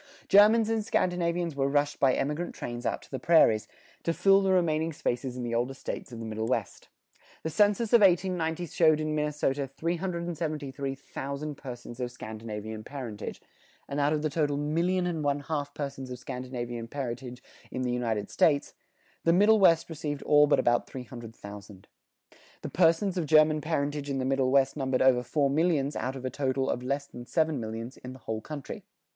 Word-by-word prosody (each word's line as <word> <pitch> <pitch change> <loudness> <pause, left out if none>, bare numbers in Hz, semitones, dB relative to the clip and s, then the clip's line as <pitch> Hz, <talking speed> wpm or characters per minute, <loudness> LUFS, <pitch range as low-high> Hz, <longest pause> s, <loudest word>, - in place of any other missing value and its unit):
Germans 215 +2 +6
and 225 -1 0
Scandinavians 175 -5 0
were 135 -1 +1
rushed 145 +1 +1
by 130 -2 +4
emigrant 150 +5 -2
trains 120 0 -4
out - - -2
to - - -19
the 130 - -3
prairies, 115 - +4 0.3
to 165 - -1
fill 195 0 +5
the 195 -1 +2
remaining 165 -3 +1
spaces 125 -2 -2
in 125 - -4
the 120 -1 -3
older 120 +3 0
States 135 - -6
of 120 - -7
the 115 - -6
Middle 110 0 -3
West. 115 -5 -3 0.5
The 160 - -2
census 205 +6 +2
of 235 - +7
1890 175 -3 +2
showed 155 -1 +3
in 155 0 -1
Minnesota 150 -2 0
373,000 150 -4 -4
persons 120 -3 -9
of 125 -1 -3
Scandinavian 110 -2 -7
parentage, 125 -7 -7 0.4
and 140 - -3
out 145 +1 +2
of 155 -1 0
the 155 - 0
total 145 -2 0
million 170 +5 0
and 165 -3 -2
one 145 0 0
half 145 -1 -3
persons 140 -3 -5
of 125 - -6
Scandinavian 125 -2 -5
parentage 125 -1 -5 0.3
in 130 - -3
the 125 - 0
United 115 -4 -2
States, 145 -3 +2 0.5
the 165 - +4
Middle 210 +5 +5
West 165 -4 +5
received 150 -3 -4
all 150 0 +5
but 145 - +4
about 120 0 +2
three 130 - -7
hundred 120 -2 -10
thousand. 100 -1 -11 0.8
The - - -4
persons 180 +3 +2
of 160 - -2
German 155 0 +5
parentage 145 -2 -2
in 135 - -1
the 130 - -1
Middle 135 -1 +1
West 135 0 +3
numbered 130 -3 +1
over 130 -2 +5
four 140 +3 +1
millions 150 -2 +1
out 130 +4 -2
of 130 -1 -7
a 130 - -2
total 135 -1 0
of 125 - -3
less 140 +3 -2
than 120 -3 -11
seven 160 -4 +1
millions 115 +3 -6
in 125 0 -9
the 130 - -13
whole 110 0 -3
country. 145 +2 -7
140 Hz, 185 wpm, -28 LUFS, 125-160 Hz, 0.8 s, of